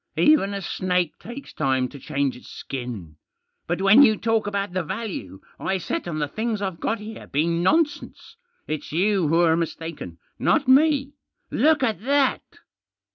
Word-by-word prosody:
Even 250 -10 +4
a 200 - -5
snake 180 -2 -1
takes 250 +5 -9
time 130 -1 0
to 140 - -11
change 140 -2 -1
its 125 - -14
skin. 115 - -7 0.5
But 175 +3 -1
when 205 +7 +7
you 220 -6 +6
talk 225 -2 0
about 200 -2 -2
the 185 - 0
value 165 - -6 0.2
I 190 - -1
set 180 - -4
on 160 -3 -3
the 150 -1 -1
things 220 +6 -2
I've 190 -4 -4
got 225 - -1
here 215 +2 -9
being 170 +4 0
nonsense, 300 - 0 0.3
it's 155 -1 -4
you 185 +1 +2
who're 165 +1 +4
mistaken, 165 - -5 0.2
not 275 - +2
me. 280 +1 +4 0.4
Look 310 -2 +3
at 220 -7 0
that 275 +2 +2
190 Hz, 160 wpm, -24 LUFS, 155-230 Hz, 0.5 s, when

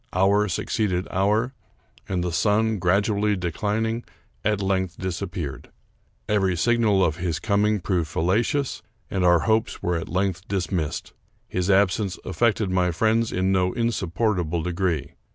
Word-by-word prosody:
Hour 100 +3 +3
suc 90 - -2
ceeded 95 -4 0
hour, 105 +7 +1 0.6
and 90 -2 0
the 90 - -1
sun, 105 +6 +2
gradually 100 +3 +2
declining, 105 +6 -1 0.4
at 105 -1 +1
length 95 -2 -1
disappeared. 95 -2 -4 0.6
Every 95 -3 +2
signal 110 -2 +3
of 80 -1 -1
his 85 -3 -1
coming 105 +3 +1
proved 85 -3 -1
fallacious, 115 - 0 0.3
and 95 -3 0
our 85 -2 +5
hopes 110 0 0
were 90 -1 +1
at 80 - -5
length 95 +1 -1
dismissed. 90 -5 -2 0.3
His 90 +1 -2
absence 100 0 +2
af 95 - -6
fected 110 -4 +2
my 90 -1 +2
friends 110 +6 +1
in 95 +1 +1
no 90 -1 +2
insupportable 95 -7 0
degree. 85 -5 -1
95 Hz, 140 wpm, -24 LUFS, 90-105 Hz, 0.6 s, our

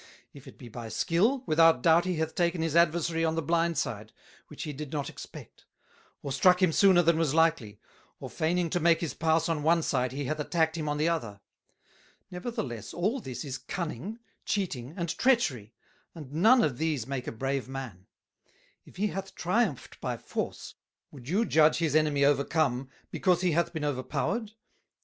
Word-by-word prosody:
If 140 -2 -14
it - - -13
be 125 - -11
by 115 0 -8
Skill, 220 - +1
without 165 - +4
doubt 165 +1 +5
he 185 -1 -1
hath 160 0 -2
taken 170 -1 0
his 165 -1 -2
Adversary 170 0 +2
on 160 0 +1
the 165 - 0
blind 165 +1 +1
side, 110 -3 -3 0.4
which - - -8
he 150 - -5
did 145 0 -7
not 145 -3 -3
expect; - - -12 0.6
or 140 - -4
struck 180 +6 +4
him 185 -3 +3
sooner 185 0 +5
than 165 0 +3
was 155 -3 +1
likely, 160 -11 +1 0.4
or - - -6
faining 170 +1 -1
to 175 - +1
make 170 0 +3
his 165 - -3
Pass 160 0 +1
on 165 -3 -1
one 165 +2 +3
side, 125 -4 0
he 140 +1 -4
hath 155 +3 -3
attacked 160 +1 0
him 155 -2 -3
on 150 - -1
the 155 +2 +1
other: 115 -12 -2 0.9
Nevertheless 180 - -5
all 210 +10 0
this 130 - -7
is 135 -1 -5
Cunning, 175 - -5 0.3
Cheating, 155 -8 -3
and 170 -3 -2
Treachery, 155 - +1 0.4
and 145 -4 -10
none 225 +10 +5
of 135 -4 -1
these 155 -7 -1
make 135 -1 -5
a - - -2
brave 135 +3 -3
Man: 125 -9 -7 0.8
If - - -16
he 195 +4 -1
hath 195 0 -6
triumphed 180 - -1
by - - -3
Force, - - -5 0.4
would 130 -2 -11
you 205 +7 +2
judge 155 -4 +4
his 160 -4 0
Enemy 150 -2 +3
overcome, 140 -2 +1 0.2
because 180 -2 +1
he 180 -2 +2
hath 170 +2 +1
been 160 -3 -5
over 145 -3 -1
powered? 205 - -3
160 Hz, 185 wpm, -28 LUFS, 140-175 Hz, 0.9 s, doubt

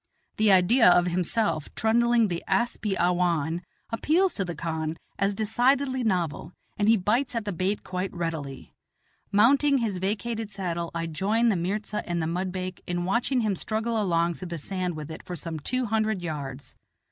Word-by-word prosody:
The 215 -1 +4
idea 190 +5 +6
of 175 0 +5
himself 175 -2 0
trundling 235 0 +3
the 175 -3 -3
asp 240 -2 0
i 195 - +1
awhan 175 -2 +1 0.3
appeals 330 +11 +2
to 195 - -1
the 175 -2 -5
khan 160 0 -3 0.2
as 200 0 +1
decidedly 255 +5 +1
novel, 175 -6 -1 0.2
and 210 0 +2
he 225 - +6
bites 235 +7 0
at 230 -2 -2
the 205 - -2
bait 185 +4 -1
quite 185 +1 -3
readily. 160 -6 -5 0.6
Mounting 275 +7 +5
his 215 -7 -1
vacated 220 +3 -2
saddle, 175 -4 -3
I 165 0 -1
join 205 +8 +1
the 210 - +2
mirza 205 +4 -2
and 175 0 0
the 160 - 0
mudbake 185 +2 -3
in 175 0 -1
watching 240 +6 +1
him 210 -3 0
struggle 220 +3 -1
along 170 -3 +1
through 185 +2 -8
the 170 -1 -4
sand 180 +2 -3
with 155 0 -7
it 160 - -7
for 180 - -6
some 165 0 -5
two 255 - -1
hundred 215 -3 0
yards. 140 -4 -5
190 Hz, 175 wpm, -26 LUFS, 170-225 Hz, 0.6 s, idea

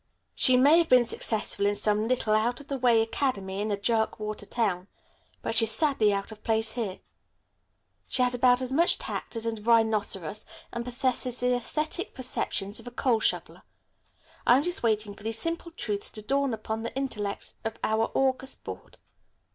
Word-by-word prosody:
She 255 -1 +4
may 290 +6 +6
have 335 - +1
been 250 -1 +6
successful 215 -3 -1
in 205 - +1
some 210 +1 +1
little, 235 -3 +1
out 230 +3 +1
of 285 - -14
the 275 - -2
way 235 -3 +4
academy 205 -6 -2
in 215 - -2
a 205 - 0
jerkwater 215 -1 -1
town, 190 -6 -1 0.6
but - - -2
she's 225 -1 +5
sadly 225 -3 +3
out 200 +1 -2
of 215 -1 -11
place 220 0 0
here. 220 -5 -4 1.1
She 255 - +2
has 250 0 +1
about 245 +1 +3
as 255 - -4
much 335 +6 +3
tact - - -5
as 230 0 -1
a 230 - 0
rhinoceros, 215 -5 +1 0.3
and 235 - -3
possesses 250 0 0
the 250 - +2
æsthetic 305 - -2
perceptions 210 -5 -1
of - - -12
a - - -3
coal 240 -2 +1
shoveler. - - -1 0.9
I'm 255 +4 +6
just 355 +1 +2
waiting 215 -3 0
for - - -16
these 225 +1 -1
simple 335 +6 -1
truths 210 -11 -2
to 215 - -3
dawn 275 +3 +1
upon 220 0 -4
the 230 +1 -6
intellects 210 -7 -4
of 225 0 -4
our 220 +1 +1
august 265 0 0
Board. - - -9
230 Hz, 180 wpm, -27 LUFS, 215-255 Hz, 1.1 s, may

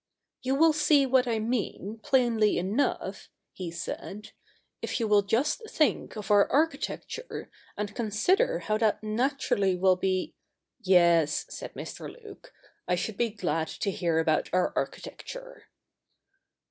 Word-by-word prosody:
' - - -59
You 265 +1 0
will 320 +2 +5
see 300 -2 +4
what 260 -1 +3
I 230 -2 +1
mean, 220 -2 -3
plainly 240 -6 +2
enough,' 200 +10 -1 0.2
he 180 -2 -5
said, 190 +4 -6 0.3
' - - -44
if - - -2
you 225 - 0
will 210 -1 +5
just 275 - 0
think 305 - +1
of 210 -1 -5
our 205 -1 +5
architecture, 315 - -2 0.3
and 205 -1 -3
consider 360 - +1
how 215 0 -1
that 220 -1 +1
naturally 215 -4 +1
will 185 0 +3
be 185 0 -1 0.2
' - - -55
' - - -45
Yes,' 170 -3 +4
said - - -7
Mr. - - -7
Luke, 435 -4 -14 0.2
' - - -43
I 180 - +2
should 200 +4 -3
be 235 +3 +1
glad 165 -6 -2
to 200 - -3
hear 170 -3 0
about 160 -1 +1
our 180 0 +1
architecture.' - - -6
215 Hz, 155 wpm, -28 LUFS, 190-275 Hz, 0.3 s, will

